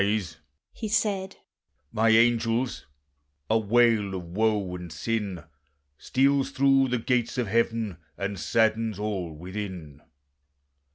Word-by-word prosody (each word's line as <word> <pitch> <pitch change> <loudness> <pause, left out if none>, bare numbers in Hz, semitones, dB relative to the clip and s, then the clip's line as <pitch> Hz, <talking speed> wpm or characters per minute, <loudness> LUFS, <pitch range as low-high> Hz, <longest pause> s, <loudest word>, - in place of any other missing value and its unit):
"Arise," 100 -6 -1 0.4
He 220 - -5
said, 205 -2 0 0.6
"my 115 +1 +2
angels! 115 - +2 0.6
a 110 - +4
wail 110 -2 +3
of 90 - -5
woe 105 -1 0
and 90 -2 -8
sin 100 0 -3 0.5
Steals 135 - +1
through 135 0 +3
the 125 0 0
gates 120 +1 0
of 125 - +1
heaven, 115 -2 0 0.2
and 100 0 -3
saddens 110 -2 +1
all 100 -5 -3
within. 90 -4 -7
110 Hz, 115 wpm, -26 LUFS, 95-120 Hz, 0.6 s, a